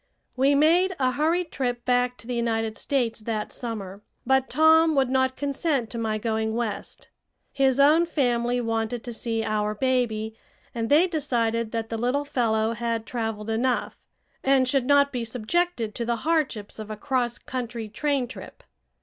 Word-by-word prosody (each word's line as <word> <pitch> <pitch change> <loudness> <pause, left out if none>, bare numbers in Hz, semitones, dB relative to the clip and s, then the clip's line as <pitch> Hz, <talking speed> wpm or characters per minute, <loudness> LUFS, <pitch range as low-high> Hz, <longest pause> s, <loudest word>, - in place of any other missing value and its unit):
We 270 +2 +3
made 345 +6 +4
a 255 -2 +2
hurried 325 +5 0
trip 245 -2 -2
back 250 0 +1
to - - -16
the 250 - -4
United 225 -2 -1
States 240 -5 -1
that 215 -1 -4
summer, 205 -5 -6 0.2
but 265 +1 +2
Tom 320 0 +5
would 265 -2 +2
not 260 0 +2
consent 280 -3 -1
to 235 - -4
my 220 -1 -1
going 220 0 -1
West. 230 -3 -4 0.4
His 270 -1 +2
own 310 +5 +5
family 245 -5 +1
wanted 225 0 -2
to 240 - -6
see 225 0 -2
our 210 0 -1
baby, 220 -3 0 0.4
and 230 -1 -2
they 310 +5 +6
decided 235 -9 -1
that 225 -1 -2
the 225 - -3
little 255 +5 0
fellow 225 -5 +1
had 230 -1 -2
traveled 225 -2 -3
enough 245 +2 0 0.5
and 265 -1 +3
should 255 -1 +1
not 285 0 +4
be 245 -2 -2
subjected 235 +1 -1
to 240 - -3
the 235 0 0
hardships 280 -12 -1
of 215 0 -7
a 215 - -5
cross 250 -2 -1
country 240 -3 -5
train 275 +3 -1
trip. 250 - -11
245 Hz, 165 wpm, -25 LUFS, 225-275 Hz, 0.5 s, they